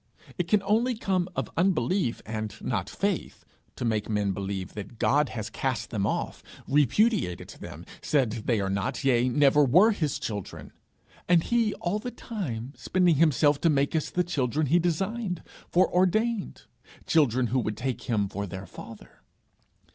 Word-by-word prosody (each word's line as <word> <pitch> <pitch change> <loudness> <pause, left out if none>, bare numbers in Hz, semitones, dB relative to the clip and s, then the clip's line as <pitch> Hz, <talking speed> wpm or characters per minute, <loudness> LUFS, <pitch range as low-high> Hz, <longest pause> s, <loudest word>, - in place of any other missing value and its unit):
It 180 -3 -2
can 210 +2 +3
come 195 - -13
only 230 +3 +2 0.4
of - - -3
unbelief 180 -5 +1
and 110 -1 -4
not 100 -6 -2
faith, 200 -3 -3 0.3
to - - -4
make 110 -2 -1
men 105 -2 +1
believe 95 -1 -4
that 105 +2 -8
God 145 +5 +2
has 110 -3 -5
cast 130 -3 -2
them 105 -3 0
off, - - -3 0.3
repudiated 150 - +2
them, - - -9 0.2
said 135 -7 +1
they 115 -4 +2
are 100 - -1
not, 100 +8 -2
yea 125 -2 +3
never 145 +3 +4
were, 180 - +6
his 155 -9 -1
children 100 -4 -6 0.6
and 170 -2 +5
he 230 -3 +1
all 180 +4 -2
the 245 - -5
time 145 - -5
spending 180 -4 +2
himself 150 -2 +3
to 165 - +4
make 140 0 +1
us 155 - 0
the 180 - 0
children 150 -3 0
he 165 +6 +3
designed, 180 +3 -2 0.3
foreordained 190 +5 +1 0.4
children 130 -6 +3
who 130 - +3
would 110 -3 -2
take 130 +2 -4
him 105 -4 +1
for 100 +1 -4
their 95 +2 -7
Father! 115 +1 -12
145 Hz, 160 wpm, -27 LUFS, 110-180 Hz, 0.6 s, were